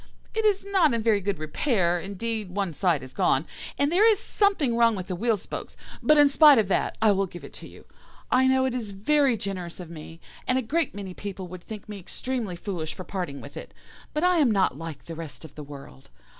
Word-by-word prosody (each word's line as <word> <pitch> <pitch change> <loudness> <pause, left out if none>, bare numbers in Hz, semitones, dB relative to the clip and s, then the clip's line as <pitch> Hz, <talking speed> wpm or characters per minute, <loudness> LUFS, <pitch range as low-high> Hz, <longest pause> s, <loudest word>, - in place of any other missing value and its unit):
It 445 0 0
is 400 -2 +2
not 375 -10 +3
in 225 - -2
very 215 -3 +3
good 200 -1 -1
repair; 175 - 0
indeed, 210 +2 -4
one 195 -2 -2
side 165 -4 +1
is 130 0 -11
gone, 135 +4 +2 0.3
and 285 +2 +2
there 415 +6 +6
is 425 - +2
something 395 - +1
wrong 230 -1 +4
with 185 -2 -5
the 185 - -4
wheel 225 +3 +1
spokes; - - -7 0.2
but 305 0 +5
in 290 -1 +8
spite 290 0 +7
of 210 -3 +2
that - - 0
I 215 - +6
will 195 -1 +1
give 175 0 -11
it - - -11
to - - -10
you. - - -15 0.5
I 260 +1 +4
know 260 0 +3
it 260 - -1
is 225 -5 -4
very 270 +5 +2
generous 185 -4 -5
of 175 -2 -8
me, 165 0 -10 0.3
and 255 - +2
a 260 - 0
great 310 +3 -1
many 195 -2 -6
people 195 -1 -6
would 180 0 -8
think 215 -2 -9
me 210 -1 -7
extremely 225 +1 -4
foolish 170 -4 -5
for 185 - -7
parting 175 -9 -5
with 140 - -11
it, - - -9 0.4
but 300 - -2
I 360 -1 +4
am 290 -6 +4
not 195 - +2
like 165 -1 -8
the 165 - -7
rest 160 -1 -8
of 155 - -13
the 150 - -9
world. 140 - -12
205 Hz, 235 wpm, -26 LUFS, 175-260 Hz, 0.5 s, in